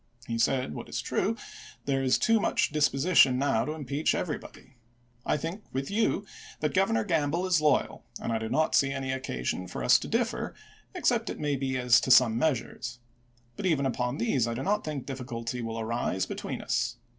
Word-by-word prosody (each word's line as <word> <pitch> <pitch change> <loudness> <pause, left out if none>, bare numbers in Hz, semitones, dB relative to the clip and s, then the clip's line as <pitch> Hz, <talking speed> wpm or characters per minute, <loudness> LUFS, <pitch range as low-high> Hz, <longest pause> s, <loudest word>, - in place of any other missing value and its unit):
He 115 -1 -3
said, 125 - +1
what - - -7
is - - -3
true, - - 0 0.5
there 135 -1 +1
is 130 -1 +3
too 225 0 +3
much 165 - +1
disposi 150 +3 +1
tion 125 -1 +7
now 130 -4 +1
to 150 - -3
impeach 145 0 -1
everybody. 140 -5 -6 0.5
I - - +2
think 165 +8 -5
with 135 +4 -3
you 205 -1 +1 0.3
that 150 -2 -1
Governor 115 -13 +2
Gamble 160 +4 0
is 180 -4 +2
loyal, 150 -3 +1 0.2
and - - -3
I 115 - 0
do 110 0 -4
not 155 +6 +1
see 135 -1 +4
any 135 -1 -3
occasion 90 - -3
for - - -5
us - - +6
to - - -6
differ, - - -1 0.4
except - - +1
it - - -5
may 145 -2 0
be 130 -1 -2
as 125 -1 +5
to - - -3
some 125 -3 +6
measm 140 -4 0
es. 115 +1 -5 0.6
But 190 - -2
even 145 -6 +2
upon 125 +1 -1
these 140 - +1
I 115 - -2
do 130 - -3
not 210 +2 +1
think 150 -4 -4
difficulty 125 -2 -5
will 115 0 -4
arise 110 -4 -1
between - - -5
us. - - 0
135 Hz, 200 wpm, -28 LUFS, 120-155 Hz, 0.6 s, tion